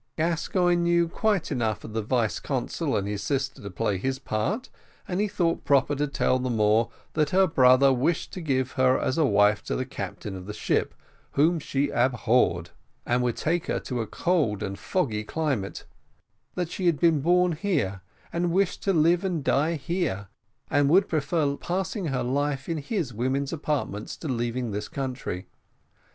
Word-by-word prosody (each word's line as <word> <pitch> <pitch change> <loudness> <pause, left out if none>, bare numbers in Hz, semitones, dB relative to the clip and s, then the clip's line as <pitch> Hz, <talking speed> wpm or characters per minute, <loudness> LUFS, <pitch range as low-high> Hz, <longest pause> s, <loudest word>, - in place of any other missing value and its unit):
Gascoigne 175 +2 +1
knew 170 0 +3
quite 200 -1 0
enough 115 -6 -1
of 110 - -8
the 110 - 0
vice 115 0 0
consul - - -2
and 100 -1 -2
his 105 -1 -3
sister 135 -2 -2
to 100 - -6
play 95 +1 -1
his 130 +6 -1
part 160 - -2 0.4
and 180 +2 -1
he 210 - +2
thought 170 -4 0
proper 140 0 +3
to 145 +1 0
tell 140 -2 +1
the 130 0 -2
Moor 110 0 +3 0.2
that 155 -1 +1
her 190 +3 +4
brother 135 -4 +5
wished 150 +7 0
to 185 - -5
give 130 -5 0
her 130 0 +3
as 130 - 0
wife 105 -7 +4
to - - -2
the 130 - -2
captain 100 -4 -6
of 95 0 -8
the 105 - -6
ship, - - 0 0.4
whom 160 +4 +3
she 140 -1 -1
abhorred, 120 -8 +2 0.3
and 120 +1 +1
would 120 -2 0
take 170 +1 0
her - - 0
to 125 -3 -3
a 110 - -4
cold 145 - 0
and 100 0 -4
foggy 120 - -1
climate; 135 -8 -2 0.7
that 175 -2 -2
she 185 - -1
had 165 -4 +2
been 165 -4 +3
born 180 +3 +3
here, 150 - -1 0.3
and 170 0 0
wished 190 +1 +1
to 195 - +1
live 170 +2 +3
and 175 -6 -1
die 155 +6 +2
here, 140 - -2 0.4
and 145 -1 +3
would 185 +5 +5
prefer 150 -2 0
passing 185 +4 -3
her 135 -3 -1
life 135 +1 -1
in 165 -2 -2
his 150 - -3
women's 130 +5 -1
apartments, 145 -9 -3
to 160 - -6
leaving 120 -2 -2
this 105 +1 -3
country. 130 -9 -4
140 Hz, 180 wpm, -26 LUFS, 120-170 Hz, 0.7 s, brother